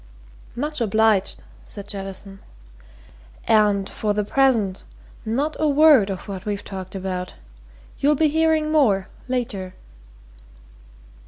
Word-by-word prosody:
"Much 300 +2 -3
obliged," 220 -2 +2 0.2
said 200 -1 -10
Jettison. 195 -1 -6 1.1
"And 205 -2 +3
for 210 -1 -2
the 210 - 0
present 220 -5 +1 0.4
not 275 +8 -1
a 310 - +2
word 290 -7 +5
of 190 +1 -6
what 190 -2 -6
we've 205 -2 -3
talked 190 -1 -7
about. 185 -1 -4 0.6
You'll 295 +2 +3
be 310 +2 +3
hearing 315 0 +2
more 215 -11 +2 0.2
later." 205 -8 -3
210 Hz, 110 wpm, -22 LUFS, 195-280 Hz, 1.1 s, word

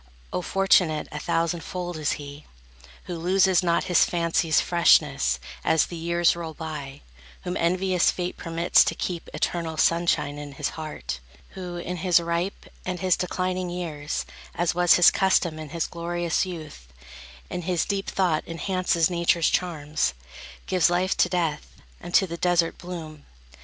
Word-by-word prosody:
Oh, - - -1
fortunate 180 -5 +2
a 150 - -5
thousand 165 +2 0
fold 175 +1 -5
is 155 -1 0
he, 145 0 -9 0.6
Who 175 - -6
loses 185 +1 +3
not 170 -2 +1
his 180 -2 +4
fancy's 170 -2 +1
freshness 65 - +3 0.2
as 160 - +3
The 175 - -8
years 170 +1 +2
roll 165 -2 -6
by; 145 -4 -7 0.4
whom 180 - -3
envious 180 +1 +2
Fate 180 0 -3
permits 165 +1 +3
To - - -1
keep 175 -2 -4
eternal 165 -2 -2
sunshine 165 -3 +1
in 145 -1 -8
his - - -2
heart, 65 - -6 0.3
Who, 180 -2 -7
in 180 +1 -4
his 175 0 +3
ripe 170 +3 -3 0.2
and 180 -1 -4
his 185 -2 +2
declining 185 0 -2
years, 155 - -4 0.3
As 175 0 +1
was 175 0 +5
his 175 - +7
custom 175 -4 +1
in 155 -1 -7
his 165 +1 -2
glorious 170 +1 -2
youth, 155 - -9 0.6
In 180 - -3
his 175 -1 0
deep 195 -1 -2
thought 175 -5 +1
enhances 170 -1 0
Nature's 170 -2 +2
charms, 155 - -1 0.5
Gives 180 -3 +3
life 180 +2 +1
to - - +3
death, 165 -5 -2 0.2
and 175 - -9
to 195 - +6
the 170 -2 -6
desert, 175 -1 +1
bloom. 160 -4 -8
170 Hz, 155 wpm, -25 LUFS, 160-180 Hz, 0.6 s, his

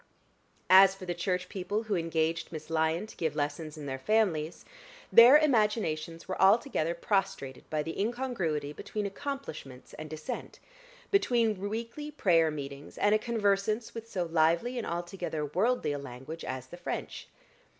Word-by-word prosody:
As 190 +1 +8
for 195 -1 -9
the 175 - -2
Church 180 +1 -2
people 205 +2 -3
who 220 -2 -3
engaged 165 -1 -1
Miss 155 0 -8
Lyon 160 +4 +1
to 215 - -13
give 160 -3 -2
lessons 150 +2 -3
in 150 - -7
their 135 -1 -4
families, 175 -4 0 0.5
their 245 +5 +10
imaginations 210 - 0
were 185 - -3
altogether 195 - +3
prostrated 170 -8 -2
by 155 -1 -1
the 165 +5 -4
incongruity 200 - -2
between 210 +6 -4
accomplishments 195 - -6
and 155 0 -8
Dissent, 155 0 -6 0.5
between 235 - +2
weekly 230 +7 -5
prayer 170 - +3
meetings 140 -1 -7
and 205 - +3
a 215 - +4
conversance 215 0 0
with 230 0 -8
so 185 -5 -1
lively 170 +9 +1
and 230 - -4
altogether 175 -2 -3
worldly 190 - +1
a 145 - -3
language 140 +5 -8
as 130 -1 -5
the 175 - -11
French. - - -5
175 Hz, 150 wpm, -30 LUFS, 155-215 Hz, 0.5 s, their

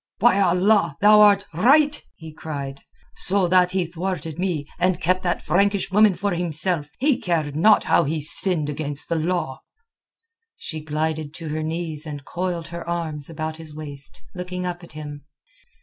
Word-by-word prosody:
"By 235 -3 +4
Allah, 180 -3 +2
thou 210 +1 +7
art 205 -1 +5
right!" 290 - +4
he 160 -2 -11
cried. 140 -3 -6 0.3
"So 190 -1 +2
that 180 0 +4
he 185 -2 +1
thwarted 170 -2 -5
me 175 -6 -1
and 180 0 +1
kept 185 +2 +1
that 175 -1 -2
Frankish 200 +1 +1
woman 210 -1 +5
for 200 +2 -1
himself, 170 -2 0
he 275 -1 +1
cared 155 -5 -1
not 210 +7 +5
how 170 - +3
he 155 +3 -1
sinned 155 +1 +2
against 145 -1 -3
the 170 - 0
law." 160 -4 -2 1.0
She 155 -1 -5
glided 155 0 -3
to 165 -2 -6
her 155 +1 -3
knees 160 -1 -3
and 145 -2 -7
coiled 175 -2 -4
her 170 0 -7
arms 160 -4 -4
about 155 -1 -5
his 160 -2 -11
waist, 145 -3 -3
looking 180 0 -5
up 175 0 -5
at 170 - -13
him. 145 -1 -8
170 Hz, 165 wpm, -22 LUFS, 155-185 Hz, 1.0 s, thou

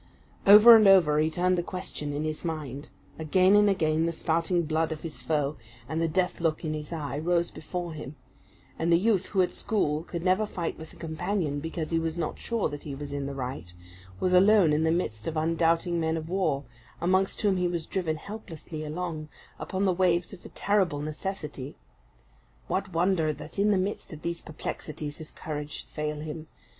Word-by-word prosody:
Over 210 +4 +11
and 215 -2 +6
over 170 -6 +6
he 155 +1 +3
turned 180 +2 +1
the - - +2
question 175 -4 -5
in 145 +1 -2
his 155 0 -3
mind; 150 -4 -5 0.3
again 185 +5 +4
and 205 0 +6
again 160 -3 +2
the - - 0
spouting 170 +2 0
blood 160 +1 0
of 155 -1 -5
his 165 -2 -5
foe, 150 -2 0 0.3
and 160 +1 -2
the 165 - +2
death 180 +2 0
look 165 0 0
in 155 - -1
his 150 0 -6
eye, 150 -3 -3
rose 170 +1 +1
before 175 +1 -5
him; 150 -2 -8 0.6
and 165 +1 +1
the 170 - +7
youth 200 0 +2
who 190 -2 +2
at 180 - -1
school 155 -8 0
could 170 -1 -5
never 185 +3 +2
fight 175 -5 -3
with 160 - -10
a - - -16
companion 160 -2 -2
because 160 +1 -4
he 165 - +2
was 165 0 -2
not 165 -3 -3
sure 230 -2 -1
that 145 - -7
he 140 -2 -6
was 145 0 -6
in 140 -1 -3
the 140 - -5
right, 125 -9 -5 0.5
was 185 - +1
alone 190 -3 +6
in 155 +2 +2
the - - +3
midst 135 -11 -1
of 160 - -2
undoubting 165 +2 +1
men 160 0 0
of 160 0 -5
war, 180 -7 0 0.4
amongst 185 +2 +1
whom 200 -3 +3
he 180 -1 +1
was 170 -2 -3
driven 175 -5 -1
helplessly 165 -4 -8
along, 155 -1 -4 0.3
upon 190 +1 -2
the 185 - +3
waves 175 0 +1
of 185 - -12
a - - -10
terrible 190 -8 +1
necessity. 150 -3 -5 0.9
What 190 +1 -2
wonder 170 -2 +2
that 175 - -9
in 205 +1 +4
the 205 - +4
midst 195 +1 -3
of 155 - -10
these 170 0 -3
perplexities 155 -1 -6
his 155 - -8
courage 150 -1 -5
should - - -8
fail 150 -1 -3
him! 155 +1 -6
165 Hz, 200 wpm, -28 LUFS, 155-185 Hz, 0.9 s, Over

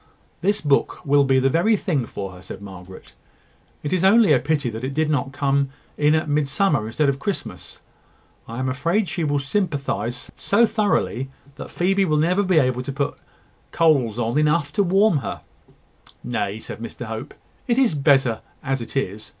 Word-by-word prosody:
"This 205 +1 +1
book 145 -2 +1
will 145 0 +4
be 135 -1 +3
the 130 +1 +3
very 210 +9 +3
thing 150 - -1
for 95 -1 -6
her," 90 0 -13
said 95 +1 -9
Margaret. 95 -2 -12 0.7
"It 145 - -2
is 185 -1 +1
only 200 -3 +6
a 130 - +4
pity 145 +1 0
that 110 +2 -7
it 135 +1 -3
did 155 0 +1
not 140 -2 0
come 140 0 +1 0.3
in 150 +1 +3
at 155 0 0
Midsummer 145 - +1
instead 145 +6 0
of 135 0 0
Christmas. 200 +5 -5 0.7
I 115 - -7
am 130 0 -1
afraid 170 +10 0
she 170 - -3
will 145 -1 +1
sympathise 140 - -2
so 220 +4 +3
thoroughly 200 - 0 0.3
that - - -8
Phoebe 195 +2 +1
will 155 -4 +1
never 175 +6 +2
be 185 -4 +2
able 130 -4 +2
to 130 - -5
put 140 +1 -2
on - - -29 0.5
coals 140 -10 +2 0.2
enough 150 -1 +2
to 205 - +2
warm 195 0 +3
her." 135 - -5 0.8
"Nay," 105 -4 -2
said 110 - -8
Mr 115 +1 -7
Hope, 110 0 -7 0.3
"it 240 -1 +1
is 260 -9 +3
better 135 -5 +2 0.2
as 135 -2 -1
it 115 - -6
is. 105 -4 -3
140 Hz, 180 wpm, -22 LUFS, 125-170 Hz, 0.8 s, only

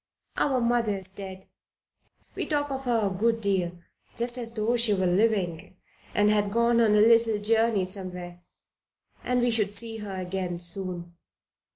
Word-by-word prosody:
"Our 265 -3 +1
mother 235 -2 +1
is 190 -1 -3
dead. 190 -1 -9 0.9
We - - -4
talk 290 -2 -1
of 270 0 -5
her 230 -3 +1
a - - +1
good 225 +3 +1
deal, 190 -5 0 0.4
just 240 +1 +1
as 230 -1 -1
though 220 +2 0
she 230 -3 +2
were 190 -1 0
living 185 -3 0 0.4
and 205 0 +3
had 205 -1 +1
gone 235 +1 +2
on 215 -2 +3
a - - +4
little 225 0 +4
journey 220 -1 +1
somewhere, 180 -2 -4 0.8
and 250 0 0
we 240 0 +2
should 215 -3 0
see 225 +2 0
her 205 -3 -7
again 185 -1 -4
soon. 175 -1 0
210 Hz, 165 wpm, -26 LUFS, 185-230 Hz, 0.9 s, a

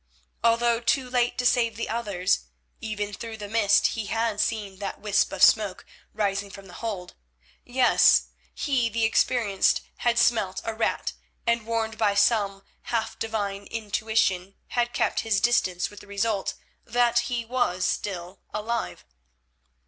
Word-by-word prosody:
Although 235 0 +3
too 240 +2 +1
late 245 -1 +1
to 250 - -1
save 235 -2 +3
the 230 - -3
others, 200 - 0 0.3
even 210 -2 -4
through 225 +1 -7
the 205 -1 -7
mist 210 -1 +3
he 220 -3 -4
had 225 -2 0
seen 205 -4 -2
that 200 - -5
wisp 205 -1 +1
of 195 - 0
smoke 205 -4 +4 0.3
rising 200 -1 -1
from 195 0 -11
the 180 - -13
hold; 200 -6 -4 0.5
yes, 250 +1 +4 0.3
he, 260 -6 +1
the 230 +1 -1
experienced, 220 -3 +2 0.2
had 240 -1 +1
smelt 215 -6 +2
a 225 - -3
rat, 220 +1 -1 0.3
and, 235 -1 +1
warned 225 -1 -2
by 205 -2 +2
some 205 -2 +2 0.3
half 230 -2 -2
divine 205 -3 -3
intuition, 210 -3 -1
had 240 0 0
kept - - 0
his 220 -3 +1
distance 185 -6 +1
with 205 - -11
the - - -15
result 200 0 -1 0.3
that 240 +1 +2
he 240 -2 -2
was 230 -7 0
still 185 -1 -3
alive. 225 +2 -3
220 Hz, 150 wpm, -26 LUFS, 200-235 Hz, 0.5 s, smoke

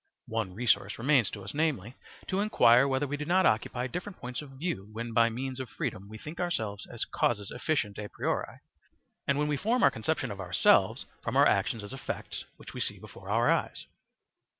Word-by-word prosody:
One 110 -5 -2
resource 120 +1 +2
remains 125 -3 +3
to 100 - -8
us, - - -7
namely, 145 - 0 0.3
to 190 - -1
inquire 125 - +5
whether 135 +1 +1
we 145 +1 -3
do 150 - -4
not 185 +3 +3
occupy 120 +1 +1
different 180 +9 -5
points 125 +2 -5
of 150 - -10
view 135 - -4
when 115 +1 -5
by 115 0 +5
means 130 +3 -4
of 130 -3 -5
freedom 100 +2 -4
we 110 - -8
think 155 +8 -9
ourselves 110 - -2
as 120 -1 -2
causes 105 -4 0
efficient 120 -7 -1
a 105 -1 -5
priori, - - -3 0.7
and 140 - +2
when 150 0 +1
we 150 -1 0
form 230 - +1
our - - +7
conception 130 +1 -1
of 100 - -7
ourselves 90 -1 +3 0.2
from - - -1
our - - +7
actions 115 -3 +2
as 105 - -7
effects 135 - -5
which - - -11
we - - -4
see - - -1
before - - -12
our - - +3
eyes. - - -1
125 Hz, 200 wpm, -30 LUFS, 110-150 Hz, 0.7 s, our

